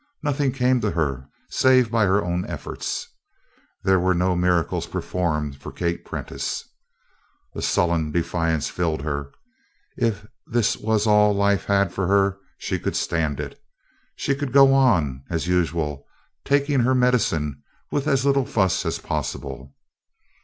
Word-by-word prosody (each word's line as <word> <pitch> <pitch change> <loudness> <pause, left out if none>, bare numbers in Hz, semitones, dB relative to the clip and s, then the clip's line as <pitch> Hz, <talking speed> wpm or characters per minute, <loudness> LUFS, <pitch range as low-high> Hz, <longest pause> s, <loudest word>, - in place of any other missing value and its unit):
Nothing 145 -2 +1
came 125 -1 +2
to - - +1
her 70 -5 -2 0.2
save 130 -3 +3
by 115 -2 +3
her 100 +2 +2
own 90 +1 -1
efforts. - - -5 0.8
There 95 -1 +4
were 95 +1 +2
no 90 +1 +1
miracles 90 -2 +1
performed 75 -6 -2
for - - -7
Kate 85 -1 -2
Prentice. - - -5 0.9
A - - -5
sullen 85 -3 +1
defiance 85 -1 0
filled 80 -5 -2
her. 70 -2 -3 0.6
If 110 -4 -1 0.2
this 120 -2 +1
was 110 0 0
all 105 -1 +4
life 100 0 +2
had 100 -2 +2
for 95 -1 -1
her 100 0 +2 0.2
she - - -3
could - - -3
stand 80 -4 -1
it; - - -7 0.5
she 140 - 0
could 140 -1 -3
go 135 0 +7
on 85 - +2
as 85 -1 -2
usual 80 -5 -1 0.4
taking 140 0 +2
her 130 +2 +3
medicine 85 - +1 0.3
with 145 +1 -1
as 135 -2 +2
little 140 -2 +2
fuss 95 -4 +1
as - - -1
possible. 65 0 -5
95 Hz, 145 wpm, -23 LUFS, 80-125 Hz, 0.9 s, go